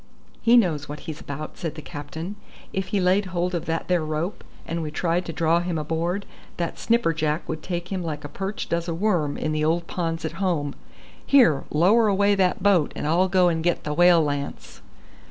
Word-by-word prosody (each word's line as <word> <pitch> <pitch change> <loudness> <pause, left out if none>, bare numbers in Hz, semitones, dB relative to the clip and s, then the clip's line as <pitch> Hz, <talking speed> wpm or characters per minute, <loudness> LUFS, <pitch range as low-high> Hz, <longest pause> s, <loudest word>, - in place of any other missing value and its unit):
"He 235 +1 +6
knows 160 -11 +1
what 150 0 -6
he's 160 -2 -7
about," 145 +2 -7
said 165 -4 -4
the 155 - -7
captain. 155 +7 -6 0.4
"If 190 -1 -2
he 205 - 0
laid 185 +2 +3
hold 180 0 -1
of 170 - -2
that 165 0 -2
there 180 -3 +2
rope, 155 +5 -3 0.2
and 165 +1 -3
we 155 - -3
tried 170 +3 0
to - - -4
draw 165 +1 +2
him 175 -1 -2
aboard, 165 +5 -2 0.3
that 170 -1 -3
snipperjack 165 -9 +1
would 155 -1 -4
take 175 0 -4
him 190 -2 -1
like 155 -3 -4
a - - -5
perch 195 +6 -4
does 170 +1 -1
a 165 - -2
worm 170 -6 0
in 155 - -2
the 155 0 0
old 165 +2 +1
ponds 165 -2 -3
at 160 - -2
home. 155 -7 0 0.5
Here, 235 - +4
lower 205 +9 +4
away 200 0 +3
that 190 -1 +1
boat, 190 -7 +3
and - - -4
I'll 175 +5 +3
go 180 -1 +4
and 165 -2 0
get 175 0 +1
the 150 - -2
whale 175 0 +6
lance." 145 -1 -4
170 Hz, 210 wpm, -24 LUFS, 155-185 Hz, 0.5 s, He